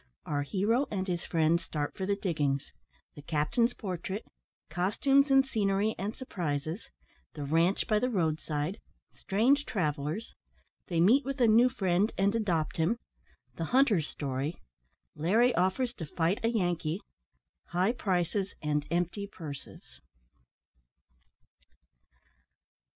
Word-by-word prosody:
OUR 145 -2 -1
HERO 210 - +1
AND 190 -2 -2
HIS 175 -2 -2
FRIENDS 165 +1 +2
START 145 -2 -3
FOR 190 - -3
THE 200 - +2
DIGGINGS 145 -8 -1 0.4
THE 145 - -11
CAPTAIN'S 175 - +1
PORTRAIT 190 0 -4 0.5
COSTUMES, 270 - +3
AND 270 0 +5
SCENERY, 210 -3 +1
AND 205 +4 -3
SURPRISES 165 - -4 0.5
THE 150 - -4
RANCHE 165 +6 +2
BY 215 -1 +2
THE 250 - 0
ROAD 160 -8 +1
SIDE 150 +5 -3 0.3
STRANGE 250 +9 +2
TRAVELLERS 155 - -2 0.5
THEY 170 -2 +1
MEET 240 +11 +5
WITH 275 +1 -4
A 240 - +5
NEW 230 +3 +6
FRIEND, 195 -3 +1
AND 200 +1 +2
ADOPT 180 -9 0
HIM 170 +9 +2 0.6
THE 165 - -2
HUNTER'S 220 - +3
STORY 140 +3 -3 0.6
LARRY 220 +11 +3
OFFERS 225 +7 +1
TO 165 -10 -7
FIGHT 170 +6 0
A 225 - +3
YANKEE 175 -6 0 0.7
HIGH 180 +5 +1
PRICES 190 -3 -1
AND 150 -1 0
EMPTY 175 +4 -1
PURSES. 155 -8 -10
185 Hz, 125 wpm, -30 LUFS, 160-220 Hz, 0.7 s, NEW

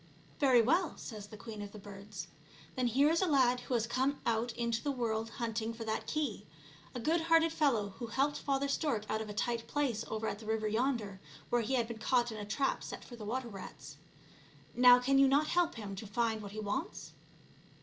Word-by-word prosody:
" - - -28
Very 255 -5 +5
well," 330 +7 +2
says 210 -4 -8
the 215 - -11
queen 215 -1 -8
of 205 -1 -7
the - - -8
birds; 200 -2 -8 0.3
" 150 +3 -22
then 255 -1 +1
here 275 +6 +4
is 335 - +2
a 375 - +2
lad 255 -5 +4
who 245 +1 -2
has 230 -1 +1
come 260 +4 0
out 230 +1 +1
into 235 -1 -1
the 290 - -1
world 225 -3 -1
hunting 230 -1 -3
for 225 - -6
that 220 -1 -3
key, 285 -10 -2 0.5
a - - -2
good 320 +8 +1
hearted 330 0 +4
fellow 240 -11 +2
who 235 - -4
helped 275 +5 0
Father 275 0 0
Stork 275 -7 -1
out 220 - 0
of 215 - -6
a - - -5
tight 235 +1 -1
place 255 -7 0
over 220 0 -3
at 205 - -3
the 220 - -11
river 220 -1 0
yonder, 220 -4 -1 0.3
where 240 - +3
he 245 +4 0
had 235 -3 +1
been 230 -1 -7
caught 240 +1 +2
in 215 - -6
a 205 - -5
trap 270 +7 0
set - - -7
for 240 - -10
the 220 -3 -8
water 250 +4 -2
rats. 150 - -9 0.8
Now 245 +1 +8
can 270 +2 +3
you 275 - +7
not 285 +3 +3
help 350 -1 +2
him 205 -4 -6
to 215 - -6
find 220 +1 0
what 200 -1 -8
he 215 - -5
wants 215 - -4
235 Hz, 230 wpm, -33 LUFS, 215-270 Hz, 0.8 s, Now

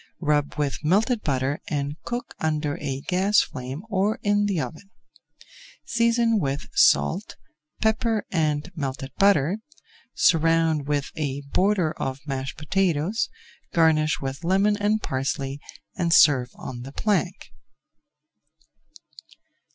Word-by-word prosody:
Rub 150 -3 0
with 145 0 -2
melted 210 - +2
butter 135 -2 -1
and 145 -1 -2
cook 240 0 -4
under 150 -2 -1
a 135 -2 -3
gas 190 +6 +3
flame 130 +3 -6
or 205 +1 0
in 205 0 +2
the 195 -5 0
oven. 155 +9 -6 1.0
Season 230 -1 +2
with 140 -4 -2
salt, 195 +6 +3 0.5
pepper, 220 0 +1
and 155 -2 0
melted 135 -3 -4
butter, 195 -1 +3 0.6
surround 165 -3 +3
with 145 -1 -1
a 145 -2 -3
border 185 -4 +2
of 130 -1 -3
mashed 135 0 -4
potatoes, 175 +4 0 0.5
garnish 155 -2 +3
with 135 +3 -5
lemon 195 +4 +3
and 210 +1 0
parsley 135 +1 -2 0.4
and 170 -2 0
serve 130 -6 +5
on 120 -2 -7
the 135 +2 -8
plank. 200 +2 -1
160 Hz, 115 wpm, -24 LUFS, 140-200 Hz, 1.0 s, serve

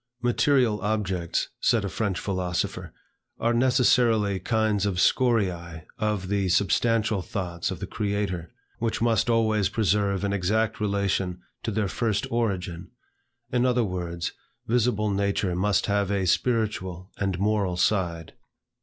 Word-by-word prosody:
"Material 120 -2 +2
objects," 95 -5 -1
said 115 -5 +2
a - - -1
French 100 -1 -2
philosopher, 90 -3 -2 0.5
"are 115 +1 +1
necessarily 120 -5 +3
kinds 110 0 +1
of 100 - -1
scoriae 90 - +1
of 105 -3 -1
the 100 -1 0
substantial 105 +3 +2
thoughts 90 -3 -3
of 95 - -5
the - - -4
Creator, 100 -5 -2 0.3
which 115 -1 -1
must 115 -1 +2
always 110 -4 +2
preserve 100 -2 +1
an 100 0 0
exact 105 +4 0
relation 100 -3 0 0.2
to - - -3
their 110 -1 0
first 105 0 -1
origin; 95 -6 -2 0.6
in 125 0 +2
other 125 -1 +2
words, 85 -4 -3 0.3
visible 110 -3 +1
nature 100 -2 0
must 100 +2 +1
have 100 -1 0
a 100 -2 0
spiritual 95 -4 -1
and 95 -3 -1
moral 100 -2 0
side." 85 -5 0
100 Hz, 130 wpm, -26 LUFS, 95-110 Hz, 0.6 s, necessarily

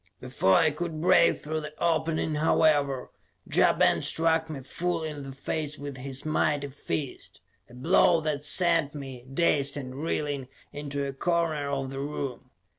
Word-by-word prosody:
Before 125 -7 +2
I 160 -1 +4
could 160 +1 -4
break 180 +1 +4
through 155 +1 -3
the 150 0 -8
opening, 160 -1 0
however, 150 -3 +2 0.3
Ja - - +4
Ben - - +3
struck 160 0 +1
me 145 -4 -6
full 170 +5 -2
in 150 -2 -5
the 135 -1 -7
face 150 +2 -4
with 140 -2 -7
his 135 +1 -6
mighty 145 -2 0
fist; 140 0 -5 0.3
a 120 - -14
blow 165 +5 +4
that 150 -2 -2
sent 165 -1 +3
me, 135 -4 -8
dazed 140 -2 +2
and 130 -2 -6
reeling, 145 -2 -2 0.3
into 145 -1 -4
a 135 - -4
corner 160 -1 0
of 135 -1 -2
the 135 - -5
room. 140 -3 -5
150 Hz, 160 wpm, -27 LUFS, 135-160 Hz, 0.3 s, I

